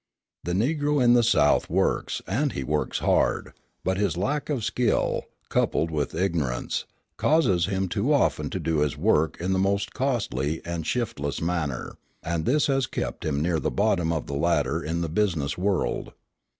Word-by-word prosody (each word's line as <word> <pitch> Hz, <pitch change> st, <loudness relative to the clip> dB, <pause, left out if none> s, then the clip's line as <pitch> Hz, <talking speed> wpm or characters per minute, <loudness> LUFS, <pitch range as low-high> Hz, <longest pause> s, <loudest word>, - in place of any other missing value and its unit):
The 85 Hz, -, -2 dB
Negro 145 Hz, -, +1 dB
in 120 Hz, -2 st, +5 dB
the 120 Hz, -, +6 dB
South 110 Hz, -11 st, +3 dB
works, -, -, 0 dB
and 130 Hz, -, 0 dB
he 70 Hz, -, -3 dB
works 75 Hz, +3 st, -1 dB
hard; -, -, +1 dB, 0.3 s
but 95 Hz, 0 st, 0 dB
his 100 Hz, -3 st, 0 dB
lack 145 Hz, +12 st, -1 dB
of 135 Hz, -7 st, -1 dB
skill, 120 Hz, +1 st, 0 dB, 0.2 s
coupled 80 Hz, -, +1 dB
with 75 Hz, -3 st, -2 dB
ignorance, 80 Hz, -9 st, -1 dB, 0.3 s
causes 100 Hz, -, +3 dB
him 95 Hz, -1 st, -1 dB
too 100 Hz, -, 0 dB
often 80 Hz, -, +2 dB
to 95 Hz, -, -3 dB
do 80 Hz, -2 st, 0 dB
his 75 Hz, -2 st, 0 dB
work 80 Hz, +2 st, +2 dB
in 90 Hz, +2 st, 0 dB
the 95 Hz, -, +1 dB
most 100 Hz, +1 st, 0 dB
costly 80 Hz, -, -1 dB
and 85 Hz, -2 st, -4 dB
shiftless 75 Hz, -, -2 dB
manner, 80 Hz, -6 st, -3 dB, 0.2 s
and 85 Hz, -1 st, -2 dB
this 145 Hz, +4 st, +3 dB
has 135 Hz, -3 st, +1 dB
kept -, -, -4 dB
him 75 Hz, -1 st, 0 dB
near 85 Hz, -1 st, +1 dB
the -, -, -1 dB
bottom 95 Hz, -5 st, +1 dB
of 80 Hz, -2 st, -2 dB
the 70 Hz, -, -6 dB
ladder 75 Hz, 0 st, +1 dB
in 85 Hz, +2 st, -2 dB
the 85 Hz, -, -1 dB
business 80 Hz, -5 st, 0 dB
world. 95 Hz, 0 st, -1 dB
90 Hz, 175 wpm, -26 LUFS, 80-110 Hz, 0.3 s, the